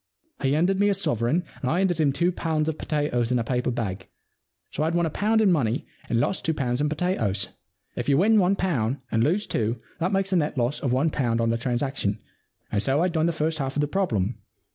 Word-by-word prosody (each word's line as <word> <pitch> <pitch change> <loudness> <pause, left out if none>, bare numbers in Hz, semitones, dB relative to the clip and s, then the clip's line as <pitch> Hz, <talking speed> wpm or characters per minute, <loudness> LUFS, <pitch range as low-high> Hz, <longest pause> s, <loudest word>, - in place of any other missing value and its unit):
He 135 0 +2
handed 180 +6 +2
me 205 0 +4
a 200 - +2
sovereign 150 - 0 0.2
and 130 - -1
I 165 - +1
handed 185 -3 +1
him 145 -2 +3
two 175 +6 +1
pounds 160 -3 -1
of 160 -1 -2
potatoes 135 -6 0
in 125 - +3
a 120 - 0
paper 125 +1 -1
bag. 100 -6 -3 0.6
So - - -3
I'd 160 +2 +1
won 170 0 +2
a 160 - -2
pound 220 +6 +2
in 205 -3 +4
money 125 -8 +1 0.2
and 115 - +2
lost 185 - 0
two 160 - 0
pounds 125 -2 -1
in 150 - +1
potatoes. 115 - -1 0.5
If - - -2
you 140 - +4
win 215 +6 +5
one 190 +1 +3
pound 140 - 0
and 115 0 +2
lose 185 - +1
two, 115 +1 -1 0.2
that 175 +3 0
makes 195 0 0
a - - +4
net 150 -3 0
loss 120 +3 0
of 135 - -1
one 140 +6 +2
pound 120 -5 0
on 115 0 +2
the 115 - +1
transaction, 120 -4 -1 0.5
and 100 - +1
so 140 +7 +2
I'd 180 - +1
done 160 0 +2
the - - +2
first 160 0 -1
half 135 -1 -2
of - - +2
the 145 - +1
problem. 125 - -1
145 Hz, 240 wpm, -25 LUFS, 120-175 Hz, 0.6 s, win